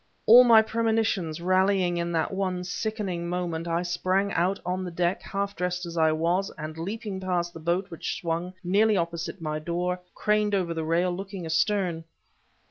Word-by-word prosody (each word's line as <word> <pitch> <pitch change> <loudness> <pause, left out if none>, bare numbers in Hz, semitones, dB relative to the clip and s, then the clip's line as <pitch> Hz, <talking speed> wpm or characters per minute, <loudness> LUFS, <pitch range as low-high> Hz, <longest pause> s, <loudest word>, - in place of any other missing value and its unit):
All 240 +3 +9
my 230 -3 +7
premonitions 220 -8 0
rallying 185 0 +2
in 170 0 -2
that 165 +3 0
one 185 -2 -1
sickening 180 -2 -3
moment, 175 -2 -3
I 170 +1 0
sprang 185 +3 0
out 180 +4 +1
on 180 +1 -2
the 180 - -4
deck, 175 +1 -1
half 200 0 -3
dressed 180 +1 -2
as 170 0 -7
I 160 -1 +3
was, 170 +5 0
and 155 0 -6
leaping 200 +4 -5
past 175 -2 -1
the - - -9
boat 175 +4 -1
which 165 - -4
swung 170 0 -3
nearly 205 +4 +3
opposite 170 +1 -3
my 155 -1 -2
door, 175 +3 -2 0.2
craned 210 -1 +1
over 180 -3 0
the 160 -1 -3
rail, 170 +3 +1
looking 190 0 -6
astern. 165 0 0
180 Hz, 175 wpm, -26 LUFS, 170-195 Hz, 0.2 s, All